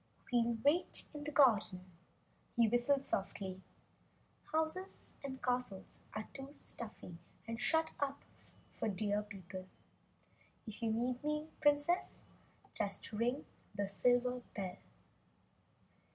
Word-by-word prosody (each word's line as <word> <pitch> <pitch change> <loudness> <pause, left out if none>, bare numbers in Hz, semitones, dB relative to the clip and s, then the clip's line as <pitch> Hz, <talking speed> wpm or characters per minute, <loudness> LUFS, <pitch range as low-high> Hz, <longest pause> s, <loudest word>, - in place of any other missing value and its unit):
"We'll 235 -1 +4
wait 320 +5 +3
in 295 -1 -6
the 300 - -2
garden," 220 -10 +5 0.7
he 235 -1 +6
whistled 245 +5 +3
softly. 190 -1 -2 0.9
"Houses 320 +4 0
and 265 -2 -5
castles 245 -6 -1 0.2
are 215 0 -3
too 270 0 -7
stuffy 210 -10 -4 0.3
and 230 +1 -3
shut 320 +5 +4
in 280 -1 +1 0.6
for - - -1
Deer 205 +1 +1
people. 190 -2 -8 1.0
If 220 0 -7
you 225 -1 +2
need 245 +3 0
me, 300 +1 -1
Princess, 295 +4 +3 0.5
just 200 +1 -2
ring 240 +6 0 0.3
the 200 -1 0
silver 245 +4 +3
bell." 190 -3 -3
240 Hz, 110 wpm, -37 LUFS, 205-285 Hz, 1.0 s, he